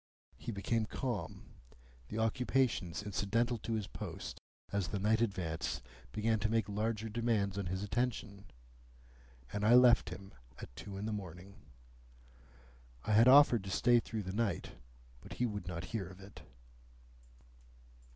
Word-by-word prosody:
He 120 - -6
became 110 +2 -1
calm; 105 -12 -4 0.6
the 105 - -5
occupations 115 -5 +1
incidental 115 +4 0
to 115 - -3
his 110 -2 -1
post - - -7 0.3
as 100 -3 0
the 90 - -2
night 110 +3 +2
advanced 85 - -2 0.3
began 110 +1 +1
to 110 - 0
make 115 -2 +1
larger 110 +2 -1
demands 110 -3 0
on 100 -2 -2
his 95 +2 -2
attention: 105 -2 -2 1.1
and 105 0 -2
I 115 +3 +7
left 125 -6 +6
him 95 +2 -9 0.2
at - - -10
two 100 -1 -7
in 100 - -4
the 110 - -2
morning. 95 -1 -7 1.5
I - - -2
had 115 +3 +7
offered 130 -5 +7
to - - -5
stay 120 +5 +4
through 110 -2 -4
the 95 0 -5
night, 110 -1 -1 0.5
but - - -10
he 125 - 0
would 105 -5 -4
not 85 -1 -4
hear 100 -6 -2
of 95 0 -12
it. 100 0 -12
105 Hz, 150 wpm, -34 LUFS, 95-115 Hz, 1.5 s, I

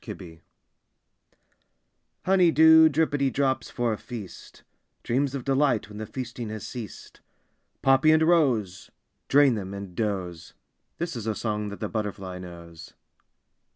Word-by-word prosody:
SONG 80 -3 -10 1.8
Honey 185 -2 +4
dew 160 0 +7
drippity 145 -3 +1
drops 135 -1 0
for 120 -2 -1
a 105 - -6
feast, 110 -7 -10 0.4
Dreams 135 +3 0
of 135 - -4
delight 135 -6 +1
when 105 0 -9
the 110 - -5
feasting 120 -3 -6
has 110 0 -6
ceased, 115 -6 -9 0.6
Poppy 135 +3 +4
and 155 0 +5
rose, 130 - +1 0.4
Drain 140 -2 +5
them 100 -3 -5
and 100 -2 -8
doze; 90 -6 -4 0.4
This 170 -4 -4
is 115 -2 -5
a 110 - -1
song 105 -1 -3
that 100 - -9
the - - -1
butterfly 100 -4 -5
knows. 85 -2 -11
115 Hz, 135 wpm, -26 LUFS, 100-140 Hz, 1.8 s, dew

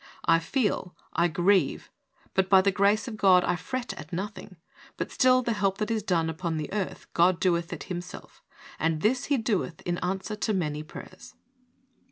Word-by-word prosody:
I 165 0 +5
feel, 185 -1 -1 0.2
I 170 +2 +3
grieve, 175 0 +1 0.4
but 190 0 +1
by 190 -1 +7
the 200 - +3
grace 200 +2 +2
of 220 - -6
God 185 -3 +5
I 175 - +1
fret 250 +8 -4
at - - -10
nothing, 195 +2 -5 0.4
but - - -3
still 255 -1 +4
the 235 - 0
help 195 -2 0
that 215 +1 -2
is 220 -1 0
done 175 -5 +1
upon 160 0 -3
the 155 +3 -5
earth 205 -3 -3
God 175 +1 +4
doeth 170 -2 +1
it - - -5
Himself; 180 -1 -8 0.4
and 160 -1 0
this 250 +5 +2
He 285 - +1
doeth 210 -7 -1
in 175 0 -2
answer 190 +3 -3
to 215 +1 -1
many 150 -5 -1
prayers." 185 +4 -11
185 Hz, 185 wpm, -27 LUFS, 170-210 Hz, 0.4 s, by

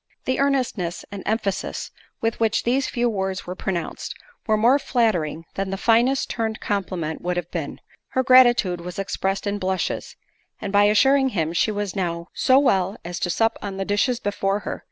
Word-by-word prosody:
The 260 - 0
earnestness 255 -11 0
and 200 -1 -6
emphasis 215 -2 -2 0.3
with 225 0 -1
which 225 -1 +1
these 260 +3 +1
few 240 0 0
words 190 -3 -2
were 180 - -4
pronounced, 185 -2 -4 0.3
were 215 -1 +3
more 240 +6 +4
flattering 180 - 0
than 195 0 -3
the 195 - -3
finest 240 +6 +3
turned 220 -1 -2
compliment 180 -6 -3
would 180 0 -2
have 175 -1 -4
been; - - -4 0.3
her 260 - +2
gratitude 240 -9 +5
was 180 +1 -7
expressed 195 0 -2
in 205 0 -1
blushes, 185 -1 -2 0.4
and 195 - -5
by 205 0 +6
assuring 265 +6 +4
him 165 -7 -1
she 175 - +2
was 205 -2 -3
now 170 -2 -2
"So 260 - +4
well, 195 -8 +2
as 175 0 -4
to 175 - -1
sup 225 +5 +1
on 195 -2 -5
the 195 - -2
dishes 220 +5 +1
before 200 -1 -1
her." - - -5
205 Hz, 180 wpm, -23 LUFS, 185-235 Hz, 0.4 s, by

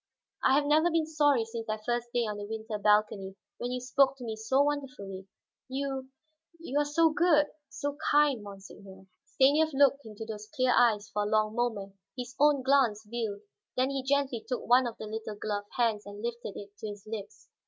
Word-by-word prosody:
I 265 - +5
have 290 +1 +3
never 310 +4 +4
been 325 -1 +1
sorry 290 -6 +2
since 225 0 -6
that 215 0 -4
first 240 0 -1
day 240 - +1
on 210 -1 -4
the 205 - -5
winter 220 0 -5
balcony 210 -2 +2 0.2
when 245 - -3
you 250 - -2
spoke 265 +2 +2
to 250 - -9
me 225 -2 -4
so 245 +6 +2
wonderfully. 255 -10 -4 0.4
You 265 0 -3 0.5
you 290 -4 -1
are 295 - +2
so 320 +2 +3
good, 310 -3 +4 0.2
so 285 +1 -4
kind, 290 -5 +4
monseigneur." 195 -1 -12 0.2
Stanief 280 +3 +4
looked 275 0 +4
into 220 -1 -8
those 215 -1 -7
clear 255 -1 +3
eyes 215 -4 +3
for 210 - -1
a 205 - 0
long 215 0 +2
moment, 220 -5 -2 0.2
his 250 +1 -5
own 290 -2 +4
glance 255 -6 +3
veiled. 215 -3 -3 0.4
Then 260 +2 +2
he 275 -1 -2
gently 265 -3 0
took 250 - -2
one 250 +1 +5
of 235 - -7
the - - -7
little 215 0 -5
gloved 205 -1 -4
hands 225 -4 +1
and 205 0 -9
lifted 235 -3 -4
it 200 0 -10
to 220 - -5
his 205 -1 -8
lips. 215 -2 -8
240 Hz, 195 wpm, -29 LUFS, 210-275 Hz, 0.5 s, I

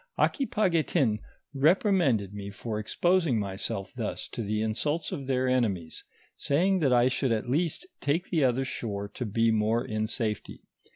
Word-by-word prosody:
Aquipaguetin 170 - +1 0.3
reprimanded 145 - +3
me 100 -1 -6
for 105 +1 -4
exposing 170 - +2
myself 100 -1 -3
thus - - -4
to - - -5
the 105 0 -1
insults 135 +9 -1
of 135 -2 -5
their 130 -1 +1
enemies, 105 -10 0 0.3
saying 185 +7 +2
that 140 -6 +2
I 120 0 +5
should 130 0 0
at 110 +1 0
least 160 - 0
take 160 +6 -1
the 160 -5 +2
other 130 +1 +2
shore 100 -5 -4
to 125 +4 -5
be 115 +2 +2
more 110 +2 +1
in 110 0 -2
safety. 110 -2 -3
125 Hz, 155 wpm, -28 LUFS, 110-155 Hz, 0.3 s, I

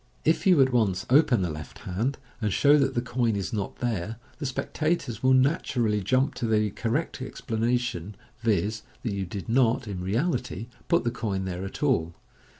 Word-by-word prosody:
If 160 +4 +2
you 180 -5 +6
at 130 -1 0
once 100 -6 +2
open 130 -7 +5
the 85 - -1
left 75 +1 -8
hand, 115 +10 -1 0.2
and 105 -2 0
show 145 +8 +5
that 140 -2 +2
the 120 - 0
coin 120 -3 0
is 100 +4 -3
not 100 -3 -3
there, 110 -3 -2 0.2
the 145 - -2
spectators 140 -1 -2
will 130 0 +5
naturally 125 -6 +2
jump 130 +8 +2
to 115 - -1
the 105 -2 +2
correct 125 - -2
explanation, 115 -5 -2 0.2
viz., 110 -1 0 0.2
that 115 - -1
you 100 -2 -3
did 95 +1 -6
not, 120 0 +2
in 95 -3 -4
reality, 120 - -1 0.2
put 170 - +3
the 120 - 0
coin 100 -5 -2
there 95 0 -4
at 95 - -6
all. 85 - +1
115 Hz, 180 wpm, -27 LUFS, 100-130 Hz, 0.2 s, you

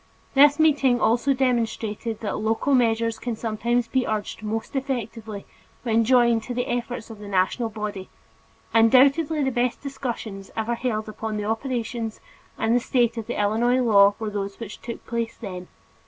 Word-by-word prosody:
This 285 +1 +6
meeting 280 -6 +4
also 235 +5 +2
demonstrated 230 -3 -1
that 210 - -2
local 225 +6 0
measures 230 -2 +2
can 240 -2 -3
sometimes 235 +2 -1
be 260 +1 0
urged 215 -1 -3
most 220 +4 -4
effectively 230 -6 -4 0.4
when 230 -1 +2
joined 235 -2 +4
to 245 - -5
the 245 - 0
efforts 240 -1 -4
of 215 -2 -11
a 205 - -8
national 200 +4 +1
body. 210 -3 -5 0.6
Undoubtedly 275 +7 +4
the 265 - +1
best 245 0 0
discussions 235 -8 -5
ever 225 +2 0
held 230 -3 -2
upon 215 0 -4
the 210 - -3
operation 230 0 -2 0.5
and 235 +2 +2
status 240 -2 +1
of 225 - -5
the - - -3
Illinois 230 +5 +2
law 200 -4 +5
were 220 -2 -4
those 200 -1 -4
which 225 -3 -8
took 235 -1 -7
place 230 -1 -3
then. 185 -5 -7
230 Hz, 160 wpm, -24 LUFS, 215-245 Hz, 0.6 s, This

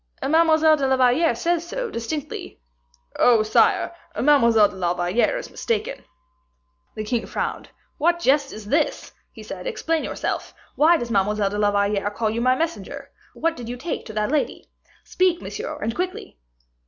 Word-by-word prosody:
"Mademoiselle 315 0 +4
de 275 -2 0
la 265 0 +2
Valliere 260 +6 +3
says 345 0 -1
so, - - -4
distinctly." 270 +6 -5 0.6
"Oh, 230 -3 +5
sire, 215 - +2 0.2
Mademoiselle 235 -7 +5
de - - -12
la 175 -2 -1
Valliere 180 - +1
is - - -7
mistaken." 465 +1 -3 0.9
The 215 - -4
king 230 +2 -2
frowned. - - -4 0.3
"What 345 +3 +3
jest 280 -2 +2
is 215 -1 -9
this?" 295 +8 0 0.2
he - - -12
said; - - -7
"explain 330 -9 -1
yourself. - - -4 0.2
Why 330 +3 +5
does 240 -5 -5
Mademoiselle 205 0 +1
de 205 - -3
la 205 -1 +3
Valliere 200 0 0
call 215 +1 -2
you 230 +2 -2
my 255 +1 +3
messenger? 330 +4 -4 0.2
What 330 0 0
did 235 -4 -8
you 245 - -5
take 320 +6 -5
to 220 - -8
that 210 +3 -1
lady? 300 -2 -2 0.3
Speak, 365 -2 +1
monsieur, - - -6
and 225 +1 -2
quickly." 365 - -5
260 Hz, 165 wpm, -23 LUFS, 215-330 Hz, 0.9 s, Oh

